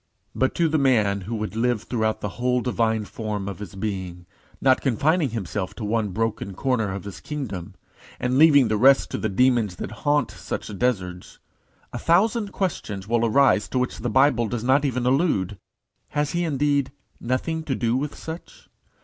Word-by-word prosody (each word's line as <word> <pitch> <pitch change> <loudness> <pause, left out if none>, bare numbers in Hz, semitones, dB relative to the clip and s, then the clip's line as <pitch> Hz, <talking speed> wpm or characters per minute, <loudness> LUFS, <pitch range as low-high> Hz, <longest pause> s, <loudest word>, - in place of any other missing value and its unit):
But 130 - 0
to 170 - +2
the 155 0 +1
man 110 -7 +2
who 110 +5 -4
would 110 0 -4
live 120 -1 0
throughout 110 -3 -1
the 105 - -2
whole 125 0 +2
divine 115 -3 0
form 105 -2 -4
of 100 - -6
his 105 0 -8
being, 95 -4 -4 0.3
not 130 -1 +3
confining 145 - +2
himself 105 -3 -4
to 110 - -5
one 110 0 0
broken 105 -1 -2
corner 115 -4 0
of 100 - -6
his 100 -2 -8
kingdom, 105 - -6 0.4
and 125 +1 0
leaving 145 -5 +7
the 110 0 0
rest 135 +5 +5
to - - -2
the 110 - -1
demons 115 -2 +2
that - - -6
haunt 145 0 +2
such 105 - -6
deserts, 90 -8 -2 0.6
a 120 - -4
thousand 205 - +2
questions 105 - -3
will 115 +1 +1
arise 115 -2 +3
to - - -2
which 125 0 -1
the 120 +2 -2
Bible 130 -1 +3
does 115 0 -3
not 135 +3 +3
even 125 -2 -1
allude. 125 - +1 0.5
Has 150 -1 -1
he 175 0 0
indeed 145 -2 +1 0.3
nothing 130 +7 -1
to 135 -4 -1
do 115 0 0
with 145 +3 -2
such? 160 +2 -9
120 Hz, 180 wpm, -24 LUFS, 105-140 Hz, 0.6 s, leaving